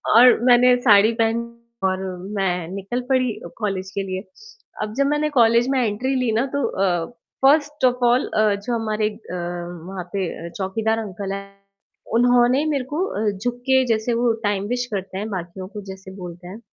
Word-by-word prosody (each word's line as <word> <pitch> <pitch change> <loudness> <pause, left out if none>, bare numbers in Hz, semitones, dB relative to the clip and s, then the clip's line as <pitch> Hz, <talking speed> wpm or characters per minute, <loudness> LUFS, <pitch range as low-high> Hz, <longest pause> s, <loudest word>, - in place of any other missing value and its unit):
और 245 +1 +8
मैंने 250 0 +6
साड़ी 215 -2 +6
पहनी 235 +1 -1 0.3
और 185 0 -1 0.4
मैं 180 -3 0
निकल 200 +6 -3
पड़ी 255 -3 +2
अ, - - -7
कॉलेज 195 -3 -3
के 200 - -1
लिए। 190 +1 -4 0.6
अब 215 - -5
जब 275 - +3
मैंने 295 +1 +1
कॉलेज 235 +2 +5
में 270 - +2
एंट्री 255 +6 -1
ली 250 -3 +1
ना, 235 +5 +2
तो 285 - 0
अ, 180 -5 0 0.4
फर्स्ट 295 -1 +3
ऑफ़ 250 0 +2
ऑल 245 +2 +3
अ, 215 -1 +4
जो 205 +4 -4
हमारे 215 -1 0
अ, 210 -4 -9 0.5
वहाँ 190 -2 -5
पे 190 -3 -1 0.2
अ, - - -6
चौकीदार 220 +3 -1
अंकल 195 -2 -5
हैं, 200 0 -6 0.7
उन्होंने 245 +3 +4
मेरे 285 -4 0
को 310 +8 -1
अ, 215 - -1
झुक 240 +5 -3
के 260 0 +5
जैसे 225 +1 +1
वो 235 0 +2
टाइम 205 -1 0
विश 245 +1 -1
करते 190 -1 -4
हैं 210 +2 -4
बाकियों 185 -1 -6
को 210 0 -7
जैसे 190 0 -11
बोलते 175 -1 -9
हैं, 200 +5 -9
220 Hz, 185 wpm, -22 LUFS, 195-245 Hz, 0.7 s, और